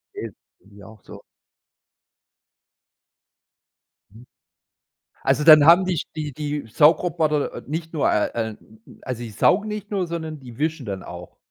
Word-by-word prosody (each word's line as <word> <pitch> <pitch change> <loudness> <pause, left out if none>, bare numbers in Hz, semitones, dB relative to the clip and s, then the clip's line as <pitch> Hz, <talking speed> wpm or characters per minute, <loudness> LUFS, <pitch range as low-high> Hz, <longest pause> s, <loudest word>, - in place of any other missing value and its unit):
Okay, - - -6 0.3
geht 100 - -24
mir 100 +1 -14
auch 110 -3 -16
so. - - -13 2.9
Mhm. 115 +3 -15 1.0
Also 135 +2 +1
dann 155 -2 +9
haben 175 +3 +7
dich 180 -4 -2
die 150 -2 -4
die 145 -2 -4
Saugroboter 155 +2 +1
nicht 160 +3 -5
nur, 155 - +1
äh, 105 - +2
äh, 115 -1 -2
n 110 0 -22 0.2
also 125 -2 -5
die 115 - -7
saugen 200 - +2
nicht 210 -1 -6
nur, 190 -3 -1
sondern 160 -3 -6
die 120 -2 -13
wischen 155 -3 -2
dann 95 -2 -5
auch? 90 0 -10
150 Hz, 145 wpm, -22 LUFS, 115-165 Hz, 2.9 s, dann